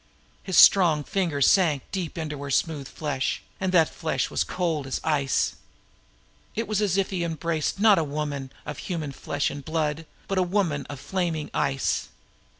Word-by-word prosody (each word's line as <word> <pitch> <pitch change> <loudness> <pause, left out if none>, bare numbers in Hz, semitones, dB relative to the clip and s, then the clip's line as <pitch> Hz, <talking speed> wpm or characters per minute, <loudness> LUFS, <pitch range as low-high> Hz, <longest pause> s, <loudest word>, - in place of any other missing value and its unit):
His 185 - -2
strong 165 -6 +7
fingers 165 -7 +1
sank 160 -8 +4
deep 180 -5 -4
into 150 -3 -4
her 140 - -5
smooth 145 0 0
flesh, 145 -3 -2 0.2
and 190 -1 0
that 165 -4 +5
flesh 160 -2 -2
was - - +1
cold 165 -6 -2
as 135 - -2
ice. 140 -4 +1 1.0
It 225 +1 -2
was 215 -1 0
as 195 -3 +1
if 195 0 0
he 180 -3 -1
embraced 165 +1 -2
not 210 -3 +6
a - - +1
woman 145 -2 -4
of 150 -1 -6
human 160 -6 -4
flesh 145 +1 -2
and 145 - -7
blood, 155 0 -2 0.2
but 195 -1 0
a - - +4
woman 175 -7 0
of 145 -2 -7
flaming 170 -2 -2
ice. 135 -1 0
160 Hz, 170 wpm, -26 LUFS, 145-185 Hz, 1.0 s, strong